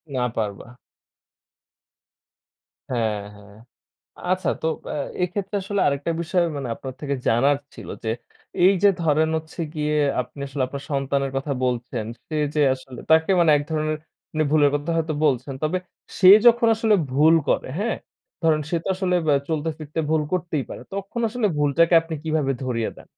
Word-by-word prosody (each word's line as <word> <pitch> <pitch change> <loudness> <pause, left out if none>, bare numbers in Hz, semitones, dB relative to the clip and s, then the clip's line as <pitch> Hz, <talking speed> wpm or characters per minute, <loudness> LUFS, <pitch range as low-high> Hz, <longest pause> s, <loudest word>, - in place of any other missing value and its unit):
না 125 - +1
পারবা। 105 -1 -3 2.2
হ্যাঁ, 110 -4 0 0.2
হ্যাঁ। 100 0 -16 0.8
আচ্ছা 185 -2 0
তো - - 0 0.3
আ - - -3 0.3
এক্ষেত্রে 195 +3 -2
আসলে 200 0 -2
আরেকটা 140 +3 0
বিষয় 175 +1 +1
মানে 135 -3 -4
আপনার 130 +1 -8
থেকে 140 -2 -2
জানার 135 +5 +3 0.2
ছিল - - -10 0.2
যে 110 - -2 0.5
এইযে 195 +1 +5
ধরেন 155 -1 +2
হচ্ছে 160 +1 -6
গিয়ে 150 0 -1 0.3
আপনি 125 +3 -8
আসলে 135 -1 -3
আপনার 140 +2 -7
সন্তানের 140 0 0
কথা 140 +1 -2
বলছেন, 120 -2 -2 0.2
সে 155 - -3 0.2
যে 150 - +2
আসলে 130 -2 -11
তাকে 160 +3 +5
মানে 165 - +5
এক 145 - -1
ধরনের 155 0 0 0.4
মানে 155 0 +1
ভুলের 145 -2 +4
কথা 145 +3 -2
হয়তো 160 -1 -1
বলছেন। 135 -1 +1
তবে 155 +4 +1 0.4
সে 185 - +7 0.2
যখন 235 0 +6
আসলে 220 -1 +2 0.2
ভুল 150 +5 +5
করে, - - +1
হ্যাঁ? 220 +3 -1 0.5
ধরেন 160 -2 +3
সে 175 - +1
তো - - -3
আসলে 185 -1 0
বা 150 - +4 0.2
চলতে 160 0 -1
ফিরতে 155 0 -7
ভুল 160 -1 +2
করতেই 170 -5 -1
পারে। - - -8
তখন 200 +4 -4
আসলে 230 -1 0
ভুলটাকে 150 +4 +3
আপনি 165 0 -6
কিভাবে 155 -4 0
ধরিয়ে 115 -3 -1
দেন? - - -14
155 Hz, 165 wpm, -23 LUFS, 135-170 Hz, 2.2 s, সে